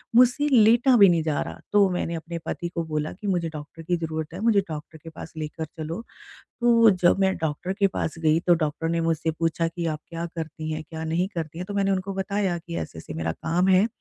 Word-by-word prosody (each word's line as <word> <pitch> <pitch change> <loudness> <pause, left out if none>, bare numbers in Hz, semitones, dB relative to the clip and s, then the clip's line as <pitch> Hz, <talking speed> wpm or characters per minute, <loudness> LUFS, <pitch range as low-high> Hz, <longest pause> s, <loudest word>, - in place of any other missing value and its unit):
मुझसे 250 +4 +5
लेटा 240 +2 +6
भी 200 -2 +8
नहीं 170 -2 +2
जा 155 -2 0
रहा। - - -6
तो 200 -2 +5
मैंने 175 -2 -2
अपने 165 +1 -5
पति 175 -2 -3
को 170 - 0
बोला 155 -1 -2
कि 205 +3 -8
मुझे 175 -4 0
डॉक्टर 155 +1 -9
की 175 +1 0
ज़रूरत 160 -1 -4
है, 180 - -6
मुझे 220 -1 +4
डॉक्टर 155 +1 -7
के 165 - -8
पास 160 0 -10
लेकर 155 +1 -4
चलो। 160 +5 -6 0.6
तो 230 -2 +6
जब 180 -1 +3
मैं 190 0 +3
डॉक्टर 160 +4 -2
के 200 0 +2
पास 175 -4 -2
गई 160 0 +3
तो 175 - +6
डॉक्टर 160 0 -1
ने 170 0 0
मुझसे 165 -1 0
पूछा 165 +1 0
कि 170 0 -4
"आप 155 -1 -2
क्या 170 0 -4
करती 160 -1 -5
हैं? 155 - -3
क्या 160 -1 -5
नहीं 170 +4 0
करती 165 -1 -4
हैं?" 180 - -5
तो 205 - -6
मैंने 195 -1 +1
उनको 190 0 -1
बताया 195 -2 -1
कि 170 0 -7
ऐसे-ऐसे 80 - -6
मेरा 80 0 -2
काम 170 - 0
है। 190 +3 +5
170 Hz, 230 wpm, -25 LUFS, 160-190 Hz, 0.6 s, भी